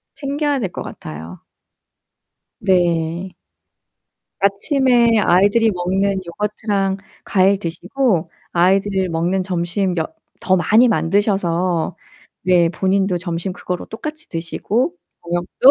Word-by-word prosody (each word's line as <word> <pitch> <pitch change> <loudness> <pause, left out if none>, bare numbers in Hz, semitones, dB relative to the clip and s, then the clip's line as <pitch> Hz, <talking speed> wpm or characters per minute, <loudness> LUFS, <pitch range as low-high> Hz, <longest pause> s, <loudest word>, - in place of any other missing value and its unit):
챙겨야 285 0 -1
될 190 -6 -2
것 - - -6
같아요. 80 +3 -8 1.2
네. 175 0 +1 1.1
아침에 235 +3 +3
아이들이 205 +5 +4
먹는 190 +2 0
요거트랑 200 +1 -1 0.3
과일 195 0 +3
드시고 180 +1 -1 0.2
아이들이 190 +2 +2
먹는 175 +3 0
점심 180 +1 -1
여 160 - 0 0.3
더 185 - +2
많이 220 +8 +4
만드셔서 185 -4 +1 0.5
네 175 -2 +4
본인도 190 +1 +1
점심 175 +1 -3
그거로 180 -1 -5
똑같이 305 +7 -7
드시고 175 +5 -1 0.3
저녁도 175 +9 +3
190 Hz, 235 characters per minute, -19 LUFS, 175-205 Hz, 1.2 s, 아이들이